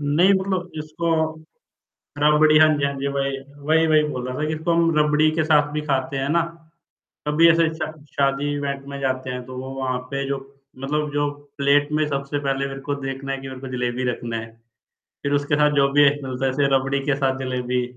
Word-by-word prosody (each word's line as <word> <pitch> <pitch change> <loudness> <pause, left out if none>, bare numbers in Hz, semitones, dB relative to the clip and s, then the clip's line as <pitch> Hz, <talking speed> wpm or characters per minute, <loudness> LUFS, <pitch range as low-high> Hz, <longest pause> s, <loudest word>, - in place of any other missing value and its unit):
नहीं 150 +7 +4
मतलब 190 -2 -1
इसको 155 +2 -3 1.1
रबड़ी 150 +1 +5
हाँ 155 - +8
जी, 140 - +1
हाँ 140 - -1
जी, 140 - -1
वही-वही, 140 +3 0
वही 155 -1 +4
बोल 125 0 -4
रहा 125 - -4
था 155 - 0
कि 155 - -1
इसको 160 +2 -1
हम 165 -1 +2
रबड़ी 150 +1 +4
के 160 0 0
साथ 150 -2 +3
भी 150 - -1
खाते 140 0 -1
हैं 135 +1 -1
ना। 170 +2 +3 0.9
कभी 165 +3 +5
ऐसे 165 0 +4
शा 155 -1 -4 0.2
शादी 140 +1 0
इवेंट 140 -1 -3
में 140 0 -6
जाते 130 -1 -1
हैं 125 0 -5
तो 130 0 -9
वो 130 +1 -6
वहाँ 130 -1 -1
पे 140 0 -2
जो 140 - -1 0.4
मतलब 150 +2 -2
जो 145 0 +1 0.3
प्लेट 145 +1 +3
में 155 0 +2
सबसे 140 +1 -2
पहले 135 -1 -1
मेरे 135 0 -7
को 145 +1 -2
देखना 135 0 -4
है 135 - -2
कि 135 - -7
मेरे 130 -1 -8
को 135 - -6
जलेबी 125 +1 -2
रखना 115 -1 -4
है। 115 0 -7 0.7
फिर 140 - -1
उसके 145 +1 +1
साथ 150 0 +4
जो 140 -1 +4
भी 145 +1 +5
एक 145 +1 +2
मिलता 130 0 -2
है 130 - +1
जैसे 140 0 +2
रबड़ी 135 +1 0
के 145 - +2
साथ 135 -1 0
जलेबी। 125 -1 -1
140 Hz, 215 wpm, -22 LUFS, 135-150 Hz, 1.1 s, हाँ